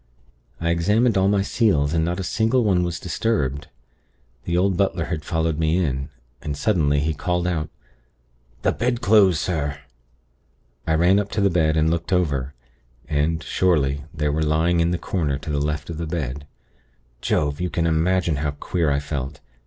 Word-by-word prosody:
I 85 Hz, 0 st, 0 dB
examined 105 Hz, +8 st, +2 dB
all 95 Hz, 0 st, +3 dB
my 100 Hz, -1 st, +2 dB
seals, 80 Hz, -10 st, +1 dB
and 80 Hz, -1 st, +2 dB
not 85 Hz, +3 st, -2 dB
a -, -, -2 dB
single 115 Hz, +6 st, +1 dB
one 95 Hz, -4 st, +2 dB
was 85 Hz, -1 st, -3 dB
disturbed. 75 Hz, -, -1 dB, 0.8 s
The 85 Hz, 0 st, 0 dB
old 95 Hz, +1 st, +2 dB
butler 95 Hz, -2 st, 0 dB
had 80 Hz, -2 st, -4 dB
followed 80 Hz, -1 st, -1 dB
me 80 Hz, +1 st, +2 dB
in, 70 Hz, -5 st, -1 dB, 0.3 s
and, 75 Hz, -1 st, -4 dB
suddenly, 75 Hz, -4 st, +2 dB
he 80 Hz, +2 st, 0 dB
called 90 Hz, +3 st, -1 dB
out: 80 Hz, -4 st, -1 dB, 0.9 s
'The -, -, +3 dB
bedclothes, 110 Hz, -6 st, +3 dB
sir!' 75 Hz, -5 st, -2 dB, 1.1 s
"I 80 Hz, -, +2 dB
ran 90 Hz, +5 st, +4 dB
up 100 Hz, -1 st, -2 dB
to 105 Hz, -, 0 dB
the 100 Hz, -1 st, +3 dB
bed, 80 Hz, -2 st, +2 dB
and 80 Hz, +1 st, +3 dB
looked 85 Hz, +2 st, -2 dB
over; 70 Hz, -7 st, 0 dB, 0.5 s
and, 80 Hz, +1 st, 0 dB
surely, 70 Hz, -6 st, +1 dB
they 75 Hz, -1 st, -1 dB
were 75 Hz, +2 st, 0 dB
lying 80 Hz, +3 st, +2 dB
in 85 Hz, 0 st, +2 dB
the 90 Hz, -, 0 dB
corner 80 Hz, -7 st, -1 dB
to 75 Hz, -, -6 dB
the 70 Hz, -1 st, 0 dB
left 75 Hz, -1 st, -2 dB
of 80 Hz, -, -6 dB
the 85 Hz, -, -3 dB
bed. 75 Hz, -3 st, -4 dB, 0.7 s
Jove! 75 Hz, +2 st, 0 dB
you 90 Hz, -, -1 dB
can 85 Hz, -1 st, -1 dB
imagine 85 Hz, 0 st, +1 dB
how 75 Hz, 0 st, -2 dB
queer 85 Hz, -4 st, 0 dB
I 70 Hz, 0 st, +1 dB
felt. 70 Hz, -1 st, -5 dB
80 Hz, 175 wpm, -22 LUFS, 75-90 Hz, 1.1 s, ran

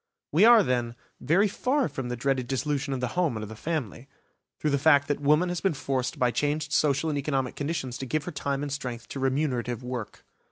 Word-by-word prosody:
We 170 Hz, +8 st, +5 dB
are, 235 Hz, -2 st, +8 dB
then, 120 Hz, -4 st, -1 dB, 0.2 s
very 190 Hz, +7 st, +3 dB
far 260 Hz, +6 st, 0 dB
from 130 Hz, -2 st, -5 dB
the 125 Hz, -, -2 dB
dreaded 130 Hz, 0 st, -1 dB
dissolution 140 Hz, +2 st, -1 dB
of 130 Hz, -2 st, -2 dB
the 125 Hz, -, -1 dB
home 170 Hz, -8 st, 0 dB
and 110 Hz, -, -5 dB
of 105 Hz, -, -7 dB
the 110 Hz, -, -8 dB
family, 135 Hz, -, -4 dB, 0.5 s
through 150 Hz, -, -1 dB
the 140 Hz, -, +2 dB
fact 145 Hz, -1 st, +5 dB
that 145 Hz, -, -1 dB
woman 150 Hz, +5 st, +3 dB
has 175 Hz, -1 st, -3 dB
been 190 Hz, -5 st, +1 dB
forced 130 Hz, -2 st, -2 dB
by 125 Hz, -1 st, +2 dB
changed 150 Hz, +2 st, -1 dB
social 150 Hz, +1 st, +2 dB
and 145 Hz, -, -1 dB
economic 135 Hz, -3 st, -1 dB
conditions 145 Hz, -5 st, -3 dB
to 135 Hz, -, -5 dB
give 155 Hz, +3 st, -1 dB
her 175 Hz, -, -5 dB
time 140 Hz, -2 st, -2 dB
and 145 Hz, -, -4 dB
strength 125 Hz, -4 st, -5 dB
to 135 Hz, -, -5 dB
remunerative 130 Hz, -3 st, -1 dB
work. 125 Hz, -3 st, -6 dB
140 Hz, 220 wpm, -27 LUFS, 125-155 Hz, 0.5 s, are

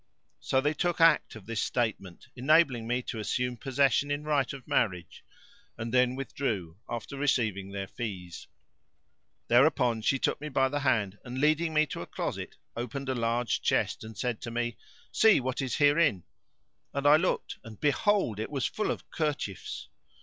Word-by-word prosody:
So 130 Hz, -, +1 dB
they 150 Hz, +2 st, +1 dB
took 175 Hz, +3 st, -1 dB
act 165 Hz, -7 st, +4 dB
of 110 Hz, -4 st, -11 dB
this 115 Hz, 0 st, -2 dB
statement 105 Hz, -7 st, -2 dB
enabling 130 Hz, -3 st, +3 dB
me 125 Hz, +1 st, 0 dB
to 115 Hz, -, -5 dB
assume 125 Hz, +3 st, -1 dB
possession 135 Hz, +2 st, +1 dB
in 145 Hz, +1 st, -2 dB
right 145 Hz, -4 st, +1 dB
of 135 Hz, -3 st, -10 dB
marriage; 90 Hz, -7 st, -1 dB, 0.5 s
and 115 Hz, +1 st, -5 dB
then 125 Hz, 0 st, +3 dB
withdrew, 105 Hz, -10 st, -3 dB
after 120 Hz, +3 st, -5 dB
receiving 110 Hz, -9 st, 0 dB
their 100 Hz, 0 st, -4 dB
fees. 95 Hz, -5 st, -7 dB, 1.0 s
Thereupon 120 Hz, -2 st, +4 dB
she 135 Hz, +5 st, +2 dB
took 135 Hz, -, -1 dB
me 150 Hz, -, -4 dB
by 135 Hz, -1 st, +2 dB
the 145 Hz, +2 st, -1 dB
hand 110 Hz, -8 st, 0 dB
and, 125 Hz, 0 st, -7 dB
leading 155 Hz, +3 st, +2 dB
me 155 Hz, 0 st, +3 dB
to 140 Hz, -, -6 dB
a -, -, -7 dB
closet, -, -, -4 dB, 0.2 s
opened 135 Hz, +3 st, -4 dB
a -, -, +1 dB
large 115 Hz, -1 st, 0 dB
chest -, -, 0 dB
and 110 Hz, -1 st, -10 dB
said 120 Hz, +2 st, -2 dB
to 120 Hz, -, -5 dB
me, 120 Hz, -1 st, -2 dB, 0.4 s
"See 220 Hz, -2 st, +5 dB
what 130 Hz, +1 st, -2 dB
is 130 Hz, -4 st, -2 dB
herein;" 145 Hz, -, +3 dB, 0.7 s
and 140 Hz, 0 st, -2 dB
I 145 Hz, +1 st, +8 dB
looked 180 Hz, +3 st, -1 dB
and 115 Hz, -3 st, -11 dB
behold, 150 Hz, -, +1 dB
it 110 Hz, -, -3 dB
was 140 Hz, -3 st, -2 dB
full 215 Hz, -, -1 dB
of -, -, -4 dB
kerchiefs. 145 Hz, -, -3 dB
125 Hz, 170 wpm, -29 LUFS, 110-145 Hz, 1.0 s, I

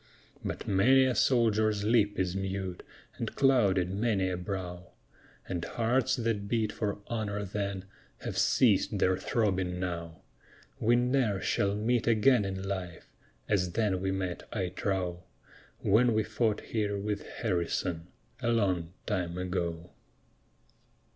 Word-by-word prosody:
But -, -, -4 dB
many 130 Hz, +7 st, +5 dB
a 130 Hz, -, +2 dB
soldier's 110 Hz, -5 st, +2 dB
lip 105 Hz, -2 st, +3 dB
is 90 Hz, -1 st, 0 dB
mute, 95 Hz, -2 st, -3 dB, 0.4 s
And -, -, -4 dB
clouded 100 Hz, -10 st, +3 dB
many 100 Hz, -3 st, +1 dB
a -, -, -1 dB
brow, 90 Hz, -1 st, -6 dB, 0.5 s
And 85 Hz, -2 st, -3 dB
hearts 120 Hz, +7 st, +1 dB
that 115 Hz, -4 st, -1 dB
beat 110 Hz, -1 st, 0 dB
for 105 Hz, -2 st, -2 dB
honor 105 Hz, -3 st, -3 dB
then, 100 Hz, -1 st, -3 dB, 0.4 s
Have -, -, -4 dB
ceased -, -, +3 dB
their 95 Hz, 0 st, +3 dB
throbbing 95 Hz, -5 st, 0 dB
now. 85 Hz, -2 st, -5 dB, 0.6 s
We 120 Hz, +2 st, +4 dB
ne'er 120 Hz, -4 st, +2 dB
shall 100 Hz, +1 st, 0 dB
meet 115 Hz, +2 st, 0 dB
again 115 Hz, 0 st, +4 dB
in 95 Hz, -1 st, -4 dB
life 90 Hz, -3 st, -5 dB, 0.3 s
As 90 Hz, -4 st, +1 dB
then 105 Hz, -5 st, +1 dB
we 95 Hz, 0 st, 0 dB
met, 95 Hz, -2 st, -3 dB
I 95 Hz, -5 st, -1 dB
trow, 90 Hz, -2 st, -2 dB, 0.6 s
When 115 Hz, +3 st, +4 dB
we 110 Hz, -, +3 dB
fought 110 Hz, 0 st, 0 dB
here 105 Hz, -2 st, -2 dB
with 100 Hz, +1 st, -2 dB
Harrison, 85 Hz, -4 st, -2 dB, 0.3 s
A 120 Hz, -, 0 dB
long 90 Hz, -7 st, 0 dB
time 90 Hz, -4 st, -2 dB
ago. 90 Hz, -2 st, -3 dB
100 Hz, 135 wpm, -30 LUFS, 90-110 Hz, 0.6 s, many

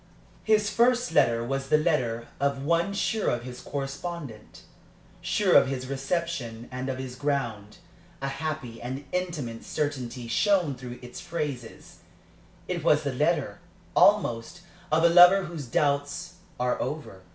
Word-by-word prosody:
His 215 Hz, -1 st, +3 dB
first 245 Hz, +2 st, +3 dB
letter 120 Hz, -5 st, +3 dB
was 135 Hz, +2 st, -3 dB
the 150 Hz, -, +5 dB
letter 130 Hz, -8 st, 0 dB
of 140 Hz, 0 st, 0 dB
one 170 Hz, +5 st, +1 dB
sure 210 Hz, +2 st, 0 dB
of 120 Hz, 0 st, -1 dB
his 125 Hz, 0 st, -8 dB
correspondent, 140 Hz, -4 st, -6 dB, 0.6 s
sure -, -, +2 dB
of -, -, +7 dB
his 130 Hz, -1 st, -3 dB
reception 135 Hz, -4 st, -3 dB
and 130 Hz, +1 st, -4 dB
of 130 Hz, -, -2 dB
his 130 Hz, -1 st, -6 dB
ground; 120 Hz, -7 st, -2 dB, 0.4 s
a 135 Hz, -, -3 dB
happy 135 Hz, -5 st, -4 dB
and 130 Hz, +4 st, -5 dB
intimate 155 Hz, -11 st, -3 dB
certainty 130 Hz, -5 st, -3 dB
shone 180 Hz, -, +2 dB
through 125 Hz, -1 st, -8 dB
its 125 Hz, +9 st, -8 dB
phrases; 150 Hz, -9 st, -5 dB, 0.7 s
it -, -, -3 dB
was -, -, +4 dB
the -, -, -2 dB
letter, -, -, 0 dB, 0.4 s
almost, 115 Hz, +9 st, +3 dB, 0.3 s
of 160 Hz, +1 st, +3 dB
a -, -, +8 dB
lover 180 Hz, +3 st, +8 dB
whose 165 Hz, -6 st, -6 dB
doubts 145 Hz, +7 st, 0 dB, 0.3 s
are 125 Hz, 0 st, 0 dB
over. 145 Hz, -11 st, -5 dB
140 Hz, 140 wpm, -27 LUFS, 125-170 Hz, 0.7 s, a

